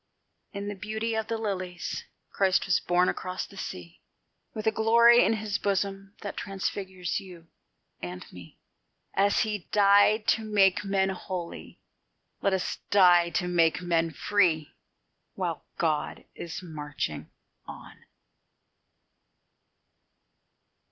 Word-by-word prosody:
In 200 -1 -5
the 205 - -3
beauty 220 +3 -3
of 220 0 -2
the 230 - -2
lilies 185 -5 -4 0.3
Christ 190 -1 +2
was 180 - +3
born 180 +1 +2
across 185 0 -3
the 200 - -16
sea, 90 - -8 0.5
With 215 0 -6
a 220 - +4
glory 235 +2 +6
in - - +3
his 215 -2 -2
bosom 195 0 -2
that 200 - -5
transfigures 190 -2 -3
you 175 -4 -13 0.5
and 90 +1 -6
me: 90 -2 -13 0.6
As 200 +1 +3
He 210 -4 -2
died 205 +1 +5
to 225 - +2
make 205 -3 +3
men 195 -1 +1
holy, 185 -2 -6 0.6
let 195 - +2
us 190 -1 -1
die 175 -3 +6
to 175 +2 -1
make 170 -1 +2
men 165 -1 +1
free, 165 -2 +1 0.6
While - - -3
God - - -1
is 170 +2 -7
marching 150 - -5 0.4
on. - - -12
195 Hz, 120 wpm, -27 LUFS, 175-205 Hz, 0.6 s, glory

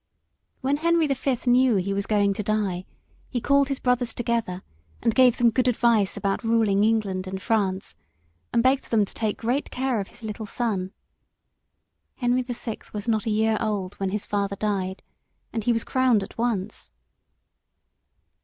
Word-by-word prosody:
When 275 +2 +1
Henry 335 +1 +3
the 280 - +1
Fifth 265 -2 -2
knew 250 -1 +4
he 195 +1 0
was 200 0 -2
going 205 -2 +2
to 205 - -3
die, 200 -4 -1 0.4
he 245 - -1
called 280 +3 +3
his 275 -1 -3
brothers 250 -1 0
together 230 -6 -2 0.4
and 230 - +3
gave 255 -1 +5
them 235 -1 +4
good 255 +2 +1
advice 230 -4 +2
about 200 +3 -1
ruling 220 -3 +3
England 205 -4 +1
and 190 0 -4
France, 195 -3 -1 0.6
and 230 - +2
begged 260 +1 +3
them 215 -3 +3
to - - -10
take 215 -2 -1
great 245 +5 -1
care 255 -3 -1
of 195 - -4
his 240 - -17
little 215 0 -5
son. 200 -6 -2 1.2
Henry 245 0 +1
the 245 -1 -5
Sixth 230 -1 -6
was 210 +2 -5
not 220 -1 +1
a - - +2
year 220 0 +2
old 205 -4 -2
when 195 -1 0
his 205 +1 -3
father 200 -1 -1
died, 195 -2 -2 0.5
and 225 -2 -3
he 240 - +4
was 230 -1 0
crowned 255 -5 +2
at - - -10
once. 220 -4 -2
220 Hz, 175 wpm, -25 LUFS, 200-245 Hz, 1.2 s, gave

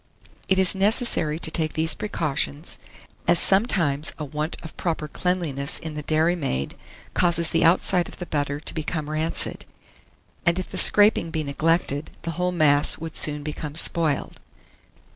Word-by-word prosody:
It 190 - +2
is 190 -1 +6
necessary 195 -6 +3
to 160 -1 -2
take 155 -3 -1
these 160 +1 +1
precautions, 150 -5 -3 0.5
as 175 - +5
sometimes 170 - +2
a 150 - -5
want 150 +3 -4
of 160 - -10
proper 160 -3 -3
cleanliness 155 -4 -1
in 160 -1 -6
the 150 - -5
dairymaid 155 - 0 0.4
causes 170 -2 +2
the - - +2
outside 175 +1 +3
of - - -12
the 175 - -6
butter 145 -2 -2
to - - -3
become 155 -1 -4
rancid, 155 +2 -1 0.8
and 170 +1 +2
if 185 - -4
the - - -2
scraping 205 -5 +4
be 160 -1 -3
neglected, 150 0 -1
the 165 - -3
whole 180 +2 -1
mass 150 -4 +3
would 165 0 -8
soon 150 -1 +1
become 150 0 -6
spoiled. 160 -2 -1
160 Hz, 155 wpm, -23 LUFS, 150-175 Hz, 0.8 s, is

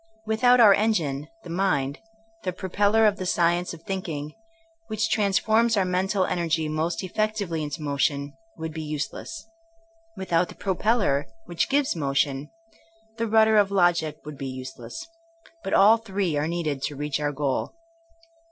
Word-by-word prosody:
Without 245 +3 +4
our 215 -4 +8
engine, 160 -10 0 0.2
the 175 - -10
mind, 150 -7 0 0.4
the 185 - -2
propeller 205 +4 +2
of 205 -1 +3
the 185 - -4
science 175 +1 +1
of 165 -1 -11
thinking, 160 -6 -4 0.5
which 215 0 -1
transforms 220 +2 +2
our 190 - +3
mental 185 +1 +1
energy 165 -3 0
most 160 +4 -2
effectively 200 -4 -2
into 150 0 -5
motion, 140 0 -1 0.2
would 160 -1 -5
be 160 - -5
useless. 150 - -5 0.7
Without 180 -2 +1
the - - -10
propeller, 195 - +1 0.2
which 170 - -1
gives 280 -4 +1
motion, 140 -1 0 0.7
the 230 0 -1
rudder 220 0 +5
of 205 -2 +4
logic 175 -5 +2
would 150 -2 -8
be 135 - -4
useless. 130 - -7 0.6
But 195 - 0
all 210 +3 +7
three 195 -7 -2
are 145 +1 0
needed 160 -5 -2
to 145 - -4
reach 150 0 -2
our 145 -1 -1
goal. 145 - -2
175 Hz, 150 wpm, -25 LUFS, 150-205 Hz, 0.7 s, our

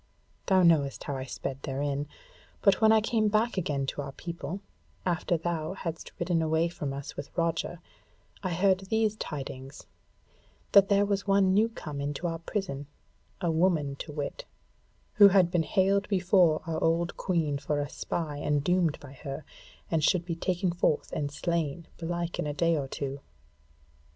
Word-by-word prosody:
Thou 190 -1 +5
knowest 150 -5 +3
how 140 - -3
I 130 0 -4
sped 135 +1 -5
therein. 140 +1 -2 0.6
But 200 +1 +4
when 220 0 +7
I 220 -1 +5
came 220 0 +1
back 215 +3 +2
again 145 -7 -1
to 140 - -3
our 140 - -6
people, 170 +3 -5 0.5
after 175 -1 +1
thou 165 0 -2
hadst 165 -4 -6
ridden 170 -1 +1
away 160 +1 +2
from 150 -5 -4
us 140 0 -6
with 140 - -6
Roger, 170 0 -1 0.6
I 185 - -2
heard 190 +1 +3
these 215 +2 0
tidings, 135 -4 -6 0.9
that 200 -1 +7
there 200 0 +4
was 200 0 -1
one 195 -1 +4
new 215 +3 +4
come 150 -10 -6
into 145 +4 -3
our 165 -1 -1
prison, 165 -6 -4 0.5
a 170 -3 +1
woman 160 -4 +2
to - - -7
wit, 145 -1 -4 0.7
who 205 -1 +9
had 190 -3 +4
been 175 - +3
haled 195 +4 +2
before 180 -4 +3
our 160 -1 -2
old 170 +1 +1
Queen 160 -6 0
for 145 +1 -1
a 145 - -1
spy 150 0 -3
and 145 -1 0
doomed 175 -2 +2
by 140 -2 -11
her, 140 +2 -7 0.5
and 160 -2 +1
should 175 +1 +3
be 175 - -2
taken 180 +1 0
forth 170 -3 0
and 145 -1 -2
slain, 170 0 -2
belike, 170 0 -3
in - - -1
a 145 - -3
day 170 +1 +2
or 140 -3 -2
two. 140 0 -4
165 Hz, 170 wpm, -29 LUFS, 145-185 Hz, 0.9 s, who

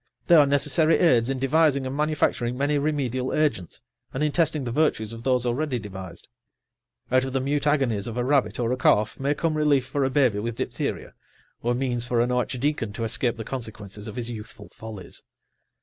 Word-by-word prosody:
They 175 - +3
are 150 -3 +7
necessary 150 +3 +3
aids 125 -8 +3
in 135 - -1
devising 140 +1 +2
and 130 +1 -4
manufacturing 145 -5 0
many 145 +2 +1
remedial 135 -4 -1
agents, 150 - -1 0.3
and 135 - -2
in 150 - +1
testing 155 -3 +1
the 120 - -3
virtues 115 -6 0
of 115 - -8
those 125 -1 +1
already 130 +2 -1
devised; 95 -5 -9 0.8
out 130 0 +4
of 130 0 -4
the 135 - +1
mute 145 +3 -1
agonies 125 -9 +1
of 115 0 -5
a 125 - 0
rabbit 135 -1 +1
or 120 -1 0
a 130 - 0
calf 105 -4 +2
may 140 +2 0
come 165 +1 0
relief 150 -4 +2
for 140 +1 -1
a 135 - +1
baby 130 -6 +2
with 115 +2 -3
diphtheria, - - -4 0.5
or 120 +1 0
means 125 -2 0
for 120 -1 +1
an 120 +1 +1
archdeacon 125 -2 -1
to 115 - -4
escape 115 +1 0
the 110 - -5
consequences 105 -4 -6
of 110 - -7
his 120 -1 -4
youthful 110 -1 -9
follies. 105 -6 -9
130 Hz, 195 wpm, -25 LUFS, 115-145 Hz, 0.8 s, are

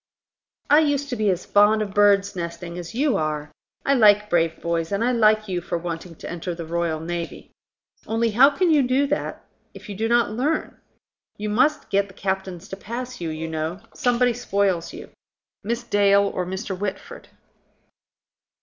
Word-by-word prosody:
"I 295 +2 +6
used 285 -2 0
to 250 - -2
be 215 -3 +1
as 180 -1 -1
fond 210 +1 +4
of 200 -2 -7
birdsnesting 190 -4 +1
as 175 +5 -8
you 280 +1 +2
are. 150 -1 -3 0.3
I 275 - +3
like 210 -4 +5
brave 165 -1 +1
boys, 170 0 -2
and 200 +3 0
I 245 - +2
like 215 -2 +3
you 180 -2 -2
for 175 - -3
wanting 170 0 -6
to - - -9
enter 175 +1 -5
the 165 -1 -6
Royal 165 -1 -1
Navy. 170 +1 -6 0.6
Only, 225 +1 +1
how 255 +6 +7
can 340 +4 +1
you 295 -3 +4 0.9
if - - -12
you - - -4
do 220 +3 -1
not 235 -2 +2
learn? 280 +8 -1 0.6
You 210 +1 -3
must 260 +8 +1
get 200 0 +2
the 195 - -17
captains 190 -2 -3
to - - -5
pass 240 +3 -6
you, 165 - -2
you 160 +1 -4
know. 160 +3 -3
Somebody 245 0 +2
spoils 200 -7 0
you: - - -10 0.5
Miss 235 +3 -2
Dale 200 -3 +4
or 180 - -2
Mr. 190 +2 -4
Whitford." 200 +1 -6
200 Hz, 170 wpm, -23 LUFS, 170-235 Hz, 0.9 s, how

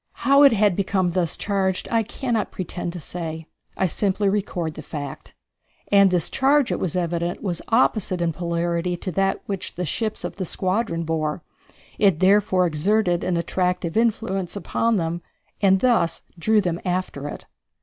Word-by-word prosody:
How 275 +1 +6
it 280 - +8
had 205 -4 +3
become 190 -2 +1
thus 170 -2 -1
charged 190 -2 -1
I 230 -1 +3
cannot 230 0 -2
pretend 175 -1 -4
to 180 - -6
say. 160 0 -6 0.3
I 190 - +2
simply 195 +3 +1
record 180 -5 -2
the - - -8
fact. 145 -3 -7 0.6
And 200 -1 +6
this 180 -3 0
charge, 275 0 +3
it - - -1
was 180 -3 -2
evident, 175 0 -2
was 180 -4 -1
opposite 215 -6 +2
in 170 -1 0
polarity 170 +1 -1
to 185 - -4
that 195 +3 0
which 195 -2 -5
the 180 - -2
ships 215 +8 -3
of - - -5
the 195 - -2
squadron 185 -1 -1
bore. 160 0 -2 0.6
It 195 -6 +4
therefore 190 -1 +4
exerted 175 +3 +1
an 180 -2 0
attractive 180 0 -1
influence 220 -5 0
upon 230 +3 0
them 170 -2 -1 0.4
and 190 -1 +4
thus 235 -10 +2 0.2
drew 215 +5 +3
them 175 -2 -2
after 180 -6 -2
it. - - -8
185 Hz, 165 wpm, -23 LUFS, 170-205 Hz, 0.6 s, it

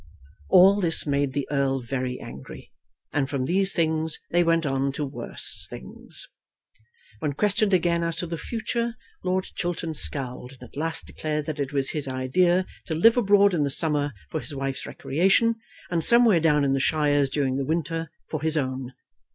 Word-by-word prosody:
All 195 +2 +7
this 165 -3 +2
made 140 -2 0
the 140 -1 -2
Earl 135 -2 +1
very 125 +1 -3
angry, 65 +1 -10 0.4
and 140 -2 0
from 135 -3 -1
these 190 +5 +2
things 160 -1 0
they 175 +1 +4
went 165 -1 +2
on 135 0 0
to 145 - -2
worse 140 - -5
things. - - -6 0.9
When 145 +2 -1
questioned 205 +5 +1
again 170 -2 +2
as 170 -1 -1
to - - -3
the 165 -1 -5
future, 235 +4 -2 0.3
Lord 185 0 +1
Chiltern 175 -2 -3
scowled, 125 - -3
and 130 - -14
at 125 - -14
last 160 +3 -2
declared 150 -1 -3
that 155 -2 -4
it 140 -1 -2
was 140 -2 0
his 150 -3 -2
idea 175 +8 +2 0.2
to 160 - -2
live 225 +8 +6
abroad 200 -4 +4
in 155 -4 +2
the 140 - 0
summer 145 -1 0 0.2
for 160 - -1
his 145 - -5
wife's 135 -1 -3
recreation, 195 +10 +2 0.3
and 165 -2 +1
somewhere 235 -5 +5
down 150 -2 +3
in 135 - +2
the 135 - +1
shires 145 -1 +2
during 135 -2 0
the 140 - -1
winter 165 +1 -2 0.2
for 155 - -4
his 160 0 +1
own. 130 -2 -3
155 Hz, 180 wpm, -25 LUFS, 135-175 Hz, 0.9 s, All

